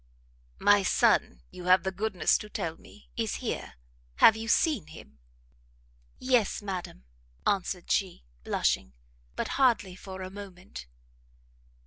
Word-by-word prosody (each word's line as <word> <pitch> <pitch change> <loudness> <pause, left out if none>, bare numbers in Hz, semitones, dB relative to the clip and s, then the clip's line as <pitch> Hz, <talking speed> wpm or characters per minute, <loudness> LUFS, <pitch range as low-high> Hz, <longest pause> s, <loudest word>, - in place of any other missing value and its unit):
"My 205 0 +5
son, 220 +2 +2
you 180 -1 -9
have 185 +1 +5
the 190 - -1
goodness 195 -1 +1
to 210 - -9
tell 165 -5 -3
me, - - -18
is - - -2
here, - - -4 0.4
have 220 - +7
you 225 0 -6
seen 250 - +2
him?" 70 - -14 1.0
"Yes, 250 -5 +1
madam," 185 - -6 0.4
answered 185 -2 -1
she, 190 - 0 0.2
blushing, 65 0 0 0.4
"but - - -2
hardly 230 -8 +3
for 190 0 -8
a 185 - -7
moment." 185 - -10
190 Hz, 125 wpm, -28 LUFS, 180-215 Hz, 1.0 s, have